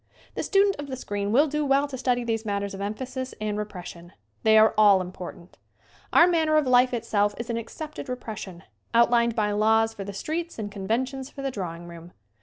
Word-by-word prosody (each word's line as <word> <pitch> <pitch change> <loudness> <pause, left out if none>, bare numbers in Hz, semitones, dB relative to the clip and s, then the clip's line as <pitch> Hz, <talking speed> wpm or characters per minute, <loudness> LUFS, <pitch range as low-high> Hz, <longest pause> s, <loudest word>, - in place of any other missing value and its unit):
The - - -3
student 395 0 +2
of 290 0 -6
the 265 - -4
screen 205 -4 -3
will 275 +7 +5
do 300 0 -1
well 275 0 +3
to 280 - -7
study 250 -1 0
these 225 -1 -2
matters 200 -2 -2
of 195 - -7
emphasis 255 +5 -4
and 215 -1 -2
repres 205 -4 -5
sion. 175 +1 -11 0.3
They 220 0 +5
are 220 0 +6
all 205 -2 +6
important. 180 -1 -8 0.5
Our 335 - +7
manner 320 -3 +2
of 305 - +3
life 250 0 +4
itself 205 -4 0
is 235 0 -4
an 230 - -2
accepted 295 +5 -7
repression, 210 -7 -6 0.3
outlined 235 0 +4
by 210 -2 +1
laws 220 +2 +3
for 200 - -6
the 200 - -6
streets 325 - -4
and 210 -2 -5
conventions 255 +7 -2
for 275 - -9
the 270 - -1
drawing 175 -6 -6
room. 170 0 -11
225 Hz, 205 wpm, -26 LUFS, 200-260 Hz, 0.5 s, Our